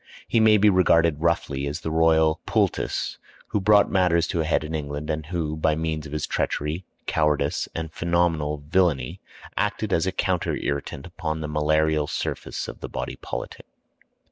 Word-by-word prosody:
He 115 - +2
may 110 -1 +6
be 105 +1 +4
regarded 85 -5 +4
roughly 75 -5 0
as 75 +4 -4
the 80 - -3
royal 80 -1 +3
poultice - - 0 0.3
who 105 - 0
brought 105 +1 +5
matters 90 -3 +3
to 85 - 0
a - - -1
head 80 - +1
in 75 +1 -6
England, 75 0 -3
and 75 -1 -4
who, 80 -3 -2
by 80 0 +1
means 80 -1 -2
of - - -12
his 75 -1 -2
treachery, 75 +5 -2 0.2
cowardice, 75 -2 +1
and 80 -1 -4
phenomenal 80 -4 0
villany, 80 -8 +1 0.3
acted 105 -1 -1
as 85 +2 +2
a - - +1
counter 90 -1 0
irritant 70 -1 -3
upon 80 -3 -4
the 75 - -3
malarial 75 0 +1
surface - - -4
of - - -8
the - - -6
body - - -5
politic. - - -7
80 Hz, 170 wpm, -24 LUFS, 75-85 Hz, 0.3 s, may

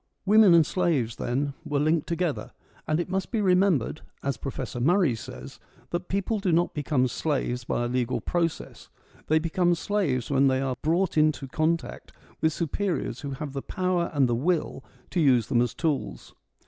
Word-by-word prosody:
Women 205 -3 +7
and 165 -2 +6
slaves 150 -11 0
then 140 +4 -1
were 145 - -2
linked 155 +1 +1
together; 170 -2 -2 0.3
and 155 +1 +1
it 175 - -2
must 190 0 -2
be 230 - -1
remembered, 180 - +2 0.2
as 140 0 -1
Professor 125 -3 -5
Murray 170 +1 +3
says, 65 - -9 0.3
that 175 +1 -3
people 200 +3 -1
do 195 -3 0
not 170 +2 +2
become 145 -3 +1
slaves 125 -3 -2
by 120 - -1
a - - 0
legal 125 0 -1
process; 170 +6 -3 0.4
they 155 - +4
become 175 +2 +1
slaves 160 - -1
when 140 0 +4
they 130 0 +2
are 135 -1 -1
brought 165 +1 +1
into 155 -3 +2
contact 160 +4 -2 0.3
with 160 - +3
superiors 170 - -2
who 145 - -5
have 140 0 -6
the 135 - -3
power 180 0 -1
and 140 -4 +3
the 120 - 0
will 150 +1 -1 0.3
to 180 - 0
use 130 -8 +4
them 120 -3 +3
as 120 - -1
tools. 155 -4 -3
155 Hz, 175 wpm, -26 LUFS, 130-175 Hz, 0.4 s, Women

